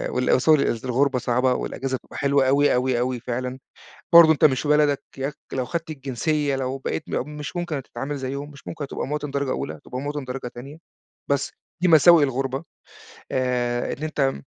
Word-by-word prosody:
وال 125 0 0
Sorry 155 -3 +5
قصدي 115 +2 -2
الغربة 130 +1 +2
صعبة، 125 +1 +1
والأجازة 130 +1 -3
بتبقى - - -13
حلوة 140 -1 +2
أوي، 145 +2 +4
أوي، 125 -1 +1
أوي 125 0 -1
فعلًا، 125 +2 -4 0.5
برضه 165 -2 +10
أنت 150 - +3
مش 130 -4 +3
في 150 - -4
بلدك 150 -1 +3 0.2
ياك 135 +2 -3 0.2
لو 130 -1 -1
خدت 165 +1 -4
الجنسية، 145 +1 -1
لو 130 0 -2
بقيت 145 +3 -3
م 135 - -2
مش 150 +4 -6
ممكن 175 -3 -2
هتتعامل 135 +2 -5
زيهم، 140 +2 -5
مش 140 -4 -15
ممكن 165 -3 -5
هتبقى 135 - -4
مواطن 150 -1 -3
درجة 140 -2 -1
أولى، 75 - -3
هتبقى 125 - -7
مواطن 145 0 -4
درجة 125 0 -5
تانية، 140 +5 -9 0.5
بس، 140 -1 0 0.3
دي 180 - +3
مساوئ 165 -1 +7
الغربة 135 +2 -1 0.7
آآ، 125 -2 0
إن 150 - -8
أنت 140 -3 0
135 Hz, 185 wpm, -23 LUFS, 130-150 Hz, 0.7 s, برضه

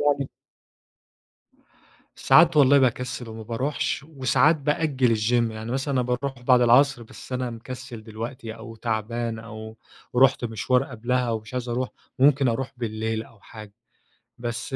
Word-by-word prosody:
يعني. 140 -2 +1 1.9
ساعات 165 -1 +5
والله 140 -1 +6
باكسل 125 -2 0
وما 110 0 -8
باروحش، 130 +5 -2
وساعات 150 +2 +3
بأجل 140 -5 +1
الgym، 115 +2 +1
يعني 110 +2 -6
مثلًا 135 +2 -1
أنا 130 - +2
باروح 125 +1 -3
بعد 125 0 +5
العصر، 125 +2 +4
بس 115 - -12
أنا 125 -1 -2
مكسل 120 0 -8
دلوقتي 115 +1 -7
أو 115 0 -10
تعبان 115 +1 -2
أو 110 0 -9 0.4
رحت 130 -1 +4
مشوار 125 +3 +1
قبلها 125 0 -1
أو 115 -1 -1
مش 110 +4 -13
عايز 125 -1 -3
أروح 125 +2 -1 0.3
وممكن 135 0 +4
أروح 125 +3 -2
بالليل 110 -1 -3
أو 115 -2 -18
حاجة. 105 -1 -12 0.7
بس 120 +3 -4
120 Hz, 140 wpm, -25 LUFS, 115-130 Hz, 1.9 s, والله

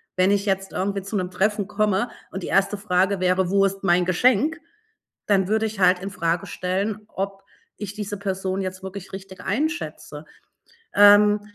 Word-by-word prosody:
Wenn 185 +1 +3
ich 200 0 +1
jetzt 195 -1 -1
irgendwie 195 +1 -1
zu 195 +3 -6
'nem 185 -2 -2
Treffen 205 +2 0
komme 210 +2 +1 0.2
und 190 0 -6
die - - -4
erste 195 +1 +2
Frage 195 -1 +1
wäre: 185 0 +1
„Wo 195 0 +3
ist 195 0 -3
mein 175 -1 +3
Geschenk?“, 255 - +2 0.7
dann 190 -3 +3
würde 220 +1 +1
ich 215 -2 -5
halt 180 -1 +4
infrage 175 -3 -2
stellen, 195 +4 -2
ob 195 0 -5 0.3
ich 205 -1 -6
diese 205 -1 -5
Person 190 -1 -2
jetzt 185 0 -5
wirklich 190 0 -8
richtig 190 0 -9
einschätze. 310 - -3 0.7
Ähm, 205 0 +7
195 Hz, 165 wpm, -23 LUFS, 185-205 Hz, 0.7 s, Ähm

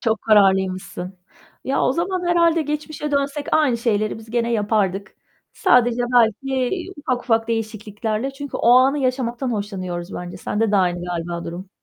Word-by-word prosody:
Çok 220 -2 0
kararlıymışsın. 190 -3 +2 0.5
Ya, 270 - 0
o - - +3
zaman, 360 +4 -2
herhâlde, 335 -1 +3
geçmişe 300 0 -4
dönsek 280 +1 -1
aynı 290 -6 +3
şeyleri 215 -2 0
biz 225 0 -13
gene 235 0 0
yapardık. 205 -3 0 0.4
Sadece 245 0 +3
belki 250 +3 +2 0.3
ufak 255 -4 -2
ufak 225 -2 +1
değişikliklerle 220 +2 -3
çünkü 285 +1 -6
o - - +2
anı 265 +3 +5
yaşamaktan 255 -1 -1
hoşlanıyoruz 185 -4 -4
bence. 180 +1 -6
Sende 210 +3 -1
de - - +3
aynı, 175 -2 +1
galiba, 170 -1 -4
durum. 175 +3 -7
225 Hz, 145 wpm, -21 LUFS, 195-270 Hz, 0.5 s, anı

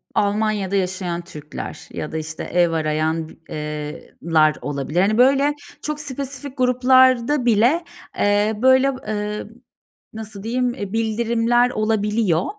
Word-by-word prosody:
Almanya'da 205 -1 0
Yaşayan 185 -2 -1
Türkler 150 -4 -8
ya 150 - -5
da 160 - -3
işte 160 0 -5
ev 175 -1 +2
arayan 160 0 -1 0.2
eee, 150 0 -6
lar 155 -2 +3
olabilir. 145 +4 -1
Hani 210 +3 +2
böyle 275 +3 +4 0.3
çok 300 0 -3
spesifik 280 -1 -6
gruplar 255 -1 +4
da 290 -3 0
bile, 240 +9 +3 0.3
eee, 205 +1 +2
böyle, 260 +1 +5 0.2
eee, 210 0 -3 0.7
nasıl 215 -2 -8
diyeyim 245 +2 0
bildirimler 230 +2 +1
olabiliyor. 215 -5 +1
215 Hz, 120 wpm, -21 LUFS, 170-250 Hz, 0.7 s, böyle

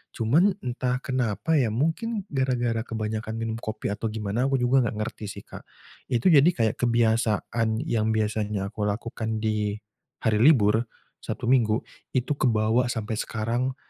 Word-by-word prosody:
Cuman 155 - +3
entah 125 +1 -2
kenapa 130 - 0
ya 120 -4 +2
mungkin 195 - -1
gara-gara 120 -4 0
kebanyakan 110 0 -3
minum 115 0 -3
kopi 110 -2 -4
atau 110 +2 -3
gimana, 110 +3 -2
aku 135 - +1
juga 130 +2 +4
enggak 110 - -2
ngerti 110 - -7
sih 100 0 -8
Kak. - - -11 0.4
itu 125 +7 +2
jadi 150 +2 +7
kayak 110 -2 +1
kebiasaan 115 0 +1
yang 110 -6 0
biasanya 105 -2 -1
aku 105 -1 -3
lakukan 110 0 -3
di 105 -1 0 0.5
hari 110 -2 +2
libur, 115 -4 +4 0.3
Sabtu, 120 - -4
Minggu 115 -4 +3 0.3
itu 130 +3 0
kebawa 115 +1 +2
sampai 110 -2 -3
sekarang 120 +4 -2
115 Hz, 145 wpm, -26 LUFS, 110-125 Hz, 0.5 s, jadi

